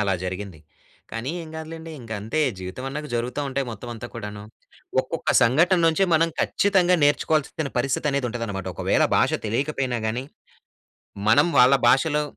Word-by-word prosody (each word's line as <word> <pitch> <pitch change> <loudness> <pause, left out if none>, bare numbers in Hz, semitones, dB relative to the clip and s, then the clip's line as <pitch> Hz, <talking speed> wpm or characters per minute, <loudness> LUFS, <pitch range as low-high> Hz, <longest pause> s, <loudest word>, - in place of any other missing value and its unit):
అలా 100 -2 +1
జరిగింది. 90 -2 -5 0.5
కానీ 115 +5 -3
ఏం 160 - -10
కాదులెండి. 160 +1 -8
ఇంక 115 -2 -13
అంతే 115 +9 -2 0.2
జీవితమన్నా 130 +10 -5
జరుగుతా 120 +4 -2
ఉంటాయి 135 0 -2
మొత్తం 115 +2 -8
అంతా 120 +2 -7
కూడాను. 105 -2 -7 0.6
ఒక్కొక్క - - -3
సంఘటన 160 +10 +4
నుంచే 165 +4 +3
మనం 165 +1 +4
ఖచ్చితంగా 185 -3 +3
నేర్చుకోవాల్సిన 150 0 +1
పరిస్థితి 135 +4 0
అనేది 140 -2 0
ఉంటదనమాట. 110 -5 -4
ఒకవేళ - - +2
భాష - - +3 0.2
తెలియకపోయినా 130 +1 -1
గానీ, 120 +4 -2 1.0
మనం 115 +10 +5
వాళ్ళ 125 +2 +7
భాషలో, 150 +4 +3
130 Hz, 140 wpm, -24 LUFS, 115-155 Hz, 1.0 s, వాళ్ళ